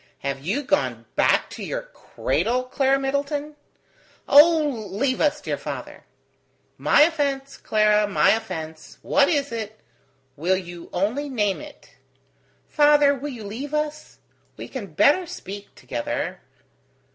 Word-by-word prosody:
"Have 140 0 -3
you 215 - -1
gone 290 +2 0
back - - +3
to - - -7
your - - -4
cradle, 255 - -2
Clara 270 +1 +1
Middleton?" 285 +2 -2 0.7
"Oh, 295 -6 +5
leave 255 +7 -1
us, 300 -1 +2
dear - - -3
father!" - - -7 0.7
"My 295 - +5
offence, 280 -4 -1
Clara, 210 -1 +2
my 205 - +4
offence! 160 -8 -5
What 285 0 +3
is 285 -4 0
it? 220 -2 -5 0.6
Will 180 +5 +1
you 175 -2 -9
only 230 +11 -1
name 210 -5 0
it?" 300 -1 -14 0.7
"Father, 295 -1 +5
will 285 +2 -5
you 240 -5 -8
leave 260 +9 -5
us? 300 0 -3 0.4
We - - -7
can 245 -7 -6
better 290 - +3
speak 205 - -9
together - - -4
270 Hz, 130 wpm, -23 LUFS, 210-290 Hz, 0.7 s, Oh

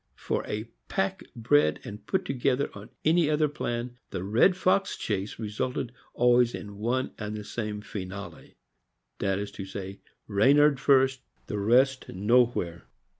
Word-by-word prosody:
For - - -2
a 105 +1 -3 0.2
pack 190 0 -1
bred 125 +6 +3
and 105 +1 -8
put 190 -1 0
together 135 0 0
on 100 +1 -10 0.2
any 160 0 +4
other 155 0 +3
plan, 125 -4 -4
the 95 -2 -4
red 115 - +4
fox 195 +1 +2
chase 100 -1 -3
resulted 120 +3 -3 0.2
always 120 0 +4
in 100 -1 -8
one 125 +4 0
and 105 0 -4
the 105 - -6
same 105 -1 -4
finale, 95 -4 -8 0.6
viz.: 100 0 -2 0.6
Reynard 140 +7 +4
first, 135 -1 +4 0.2
the 105 - -3
rest 130 +6 +3
nowhere. 100 - +1
120 Hz, 130 wpm, -28 LUFS, 105-135 Hz, 0.6 s, any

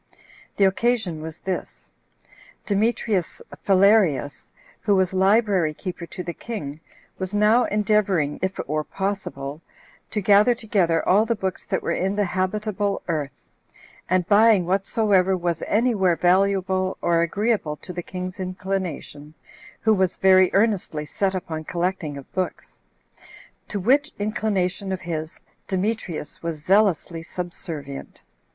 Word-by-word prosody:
The 200 - +3
occasion 195 -4 0
was 160 +1 -7
this: 190 0 -6 0.7
Demetrius 205 -3 0 0.2
Phalerius, 195 -7 +3 0.3
who 205 -2 +2
was 190 -1 +1
library 190 -4 +3
keeper 175 0 -6
to 180 - -7
the 170 0 -5
king, 155 -12 -6 0.4
was 190 +1 -3
now 215 +4 +4
endeavoring, 200 -8 +1
if 190 0 -2
it - - -5
were 155 +2 -1
possible, 160 -7 -4 0.5
to 215 - -1
gather 205 +4 +5
together 195 -8 0
all 210 +4 +4
the 230 - +1
books 190 -2 -4
that - - -1
were - - -1
in 190 +2 0
the 205 0 +1
habitable 200 +2 -1
earth, 150 -5 -4 0.6
and 185 -1 +2
buying 210 -2 +5
whatsoever 195 0 +2
was 175 -1 -2
any 235 +4 +2
where 190 -5 +2
valuable, 185 +1 +2
or 170 -1 +2
agreeable 200 -2 0
to 180 - -10
the 175 - -4
king's 185 +1 -6
inclination, 185 -5 -4 0.5
[who 220 - +4
was 190 -3 +1
very 185 -1 +5
earnestly 195 -8 +1
set 190 +5 -1
upon 160 -3 -4
collecting 175 -3 -2
of 140 - -12
books,] 185 -1 -4 0.9
to 205 - -3
which 280 +9 +2
inclination 200 -2 -1
of 190 - -3
his 160 -1 -5 0.3
Demetrius 190 -5 -3
was 165 -2 -5
zealously 190 -4 +2
subservient. 165 -5 -7
190 Hz, 130 wpm, -23 LUFS, 170-205 Hz, 0.9 s, gather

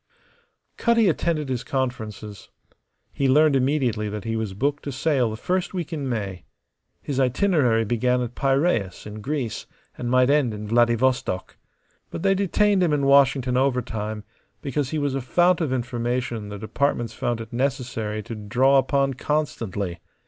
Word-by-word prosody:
Cutty 230 -2 +3
attended 155 -4 0
his 125 -2 -2
conferences. 110 -6 -4 0.6
He 135 -1 +1
learned 150 +1 +5
immediately 130 -6 +1
that 105 0 -5
he 115 0 -2
was 110 -4 -3
booked 145 +6 -1
to 140 - -3
sail 135 -2 +1
the 110 - -5
first 185 - -2
week 170 -3 -4
in 140 -4 -3
May. 100 -7 -4 0.6
His 135 -2 -2
itinerary 130 - +2
began 125 +3 +1
at 120 0 -5
Piraeus, 135 - 0
in 105 0 -8
Greece, 135 -1 -3 0.3
and 120 - -4
might 130 +1 +4
end 140 -7 +2
in 105 0 -7
Vladivostok. 120 -4 +1 0.5
But - - -6
they 195 0 +4
detained 200 +1 +2
him 170 -4 +2
in 140 -2 +1
Washington 135 -2 +4
overtime 115 -5 -1 0.4
because 140 -1 -1
he 155 - -2
was 145 -2 0
a 135 - -1
fount 175 +7 +2
of 155 -5 -1
information 120 -2 -2
the 105 - -6
departments 120 +3 -1
found 120 -1 -2
it 115 +1 -9
necessary 120 -5 -2
to 115 - -7
draw 125 +6 +3
upon 135 +1 +1
constantly. 115 - -2
130 Hz, 155 wpm, -24 LUFS, 115-145 Hz, 0.6 s, learned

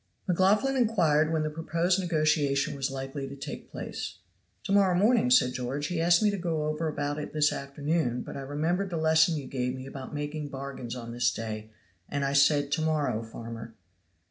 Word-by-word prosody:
McLaughlan 200 +9 +3
inquired 165 - +3
when 160 -1 +1
the 155 - -2
proposed 165 +4 0
negotiation 155 -6 +1
was 135 0 -1
likely 135 +1 -5
to 135 - -8
take 140 - -7
place. 90 - -6 0.5
"To - - -4
morrow 195 -2 +4
morning," 210 - +4
said 125 0 +5
George. 130 +4 -3
"He 175 -2 -1
asked 170 +4 +4
me 210 - +4
to 200 - -3
go 165 -3 -1
over 155 +1 -1
about 145 -1 -2
it 150 - -6
this 150 -1 +3
afternoon, 140 -2 -1
but - - -8
I 140 - -5
remembered 160 +8 -1
the 170 - -3
lesson 160 +1 +4
you 140 - -5
gave 125 -1 -2
me 130 0 -7
about 135 -1 -8
making 150 0 -4
bargains 135 -3 -6
on 115 -2 -7
this 120 0 +2
day, 110 -1 -5 0.4
and 145 -1 -1
I 140 - 0
said 140 0 +4
'To 160 +2 +1
morrow, 155 -8 0
farmer.'" 115 0 -8
150 Hz, 195 wpm, -28 LUFS, 135-165 Hz, 0.5 s, said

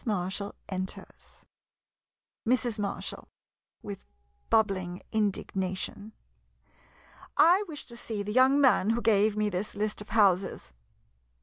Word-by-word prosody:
Mar 190 -5 -1
shall 200 +1 -5
enters. 185 0 -7 1.0
Mrs. 240 -2 +1
Marshall 200 -1 -4 0.6
[With 200 -2 -7 0.5
bubbling 190 -5 +1
indignation.] 200 0 -2 1.2
I 360 +5 +6
wish 305 -3 -7
to 235 - -12
see 220 -3 -4
the 210 - -4
young 260 +3 +5
man 255 -7 +4
who 230 +1 +1
gave 215 -1 +3
me 210 0 +2
this 190 +3 -3
list 210 0 -2
of 210 - -10
houses. 195 - +2
210 Hz, 115 wpm, -29 LUFS, 195-230 Hz, 1.2 s, I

